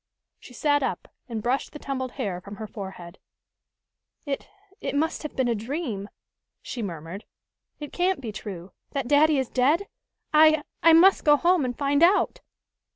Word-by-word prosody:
She 250 - -14
sat 290 +2 +2
up 265 - -3 0.2
and 220 -2 -4
brushed 255 +3 -1
the - - -7
tumbled 260 -3 -4
hair 195 -9 -3
from 200 +2 -9
her 220 - -6
forehead, 190 -4 -9 1.1
"It 280 -2 -4 0.3
it - - -4
must 320 +3 0
have 305 - -7
been 260 -2 +1
a 235 - +2
dream!" 225 - -4 0.5
she 245 - -5
murmured. 170 0 -6 0.6
"It 295 -1 -8
can't 365 0 +1
be 235 -5 -5
true 195 -4 -8 0.2
that 275 -3 -2
daddy 295 +2 +4
is 265 -2 0
dead! 295 +10 +2 0.5
I 310 0 +6 0.2
I 330 0 +7
must 365 +4 +6
go 295 -1 +6
home 350 0 +3
and 245 -1 -3
find 285 +1 +1
out!" 365 +5 +3
270 Hz, 165 wpm, -25 LUFS, 215-305 Hz, 1.1 s, I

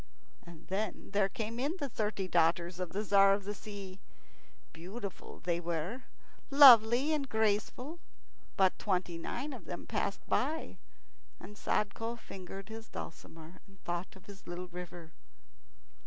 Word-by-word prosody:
And 170 -2 -13
then 195 +2 -3
there 200 -1 +2
came 230 -1 -4
in 285 +7 0
the 285 - -2
thirty 210 -5 -2
daughters 170 +1 +2
of 180 -2 -2
the 205 +4 -2
Tzar 195 -1 +6
of 200 - -6
the 205 +2 -3
Sea. 200 -2 -8 0.7
Beautiful 190 +5 -7
they 170 -1 0
were, 175 +8 -3 0.4
lovely, 265 0 +8
and 280 -3 -1
graceful; 220 +8 0 0.6
but 190 -1 +3
twenty 180 -4 -1
nine 270 - -4
of - - -9
them - - -6
passed - - -2
by, 315 +2 -1 0.6
and 210 - -11
Sadko 225 +3 -1
fingered 195 -2 -9
his 225 0 -8
dulcimer 165 +1 -9
and 195 -1 -20
thought 175 +2 -4
of 190 - -16
his 200 -1 -13
little 175 +1 -5
river. 175 -2 -8
195 Hz, 140 wpm, -33 LUFS, 180-225 Hz, 0.7 s, lovely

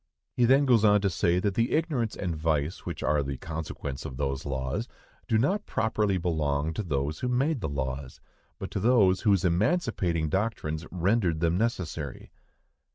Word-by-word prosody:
He 120 - +4
then 135 +4 +5
goes 120 -5 +4
on 105 -1 +6
to 100 -2 +1
say 85 +1 +2
that 100 +2 0
the 115 +4 +1
ignorance 145 -9 0
and 90 -4 -3
vice 80 0 -1
which - - -4
are 75 +1 +2
the 70 -1 -4
consequence 75 -3 -5
of 65 - -7
those 70 0 -2
laws 65 -2 -2 0.4
do 110 - +2
not 190 - +1
properly 105 -3 0
belong 80 -3 0
to 95 - -2
those 75 -4 -2
who 125 - -2
made 130 +2 +1
the 80 - -2
laws, 65 -1 -4 0.4
but - - -6
to - - -2
those 100 -4 +4
whose 100 -5 +3
emancipating 90 - +1
doctrines 80 -4 -2
rendered 90 -2 +1
them 85 +1 +1
necessary. 90 - -3
90 Hz, 170 wpm, -28 LUFS, 75-110 Hz, 0.4 s, on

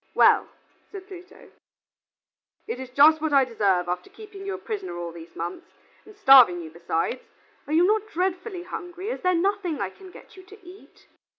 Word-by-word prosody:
"Well," - - +5 0.4
said 390 -2 -9
Pluto, 370 -2 -14 1.2
"it 460 - -4
is 260 -1 -7
just 300 +4 +5
what 315 -2 -1
I 275 -1 +5
deserve 200 -7 0
after 180 - -4
keeping 400 -1 -11
you 390 - -3
a - - -7
prisoner 400 - -6
all 170 -1 -5
these 165 0 -13
months, 170 +2 -6 0.4
and 425 -1 -16
starving 260 - +7
you 160 - -10
besides. 170 +8 -3 0.5
Are 300 - -3
you 335 +3 +5
not 430 +2 +1
dreadfully 365 0 -3
hungry, 355 +2 -7
is - - -5
there 365 -1 +2
nothing 365 -3 -1
I 195 -1 -3
can 380 - -14
get - - -16
you 375 - -12
to 385 +3 -16
eat?" 370 +3 -16
355 Hz, 185 wpm, -25 LUFS, 240-390 Hz, 1.2 s, starving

